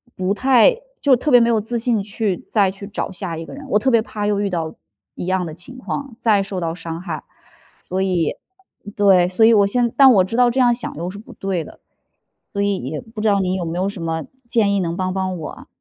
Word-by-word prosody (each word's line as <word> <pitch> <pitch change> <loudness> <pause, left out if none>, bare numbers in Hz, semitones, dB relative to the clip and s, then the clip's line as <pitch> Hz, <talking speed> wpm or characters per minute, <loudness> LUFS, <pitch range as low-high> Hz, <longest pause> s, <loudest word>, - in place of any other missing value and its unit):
不 185 +1 0
太 270 - +4 0.2
就 275 -3 +4
特 295 +5 -2
别 245 -2 +7
没 230 - +3
有 225 -2 +3
自 235 +3 -2
信 230 -2 +1
去 200 -2 -2
再 200 -4 +3
去 200 +1 -10
找 205 - -4
下 180 -3 -4
一 165 - -6
个 - - -10
人， 275 0 -9
我 210 - +3
特 260 +5 +1
别 230 -2 +4
怕 210 -2 -5
又 205 -1 +1
遇 205 - 0
到 165 -3 -3 0.4
一 - - -6
样 185 -1 0
的 155 - -6
情 180 +10 -8
况， 265 0 -5
再 210 -4 +3
受 195 -1 -3
到 165 -2 -2
伤 165 -1 -6
害。 185 - -6 0.6
所 190 +1 -3
以 180 -4 0 0.6
对， 190 -3 +5
所 220 +4 +4
以 230 - +6
我 200 -2 +5
现 240 +2 +1
但 270 -2 +8
我 195 -6 +5
知 195 +5 -4
道 245 0 +5
这 250 +3 -1
样 245 -2 +5
想 240 - -3
又 170 +3 -4
是 200 - -9
不 220 - -13
对 190 -4 -2
的， - - -14 0.7
所 200 - -1
以 200 -1 +1
也 145 +2 -5
不 225 -2 -11
知 220 - 0
道 200 -1 +3
你 185 0 0
有 180 -2 -3
没 165 +1 -4
有 190 - 0
什 200 -4 -7
么 160 -1 -2 0.2
建 215 -4 +2
议 - - +1
能 170 -2 -2
帮 185 0 -2
帮 190 -1 -2
我。 160 - -8
200 Hz, 270 characters per minute, -20 LUFS, 180-230 Hz, 0.7 s, 但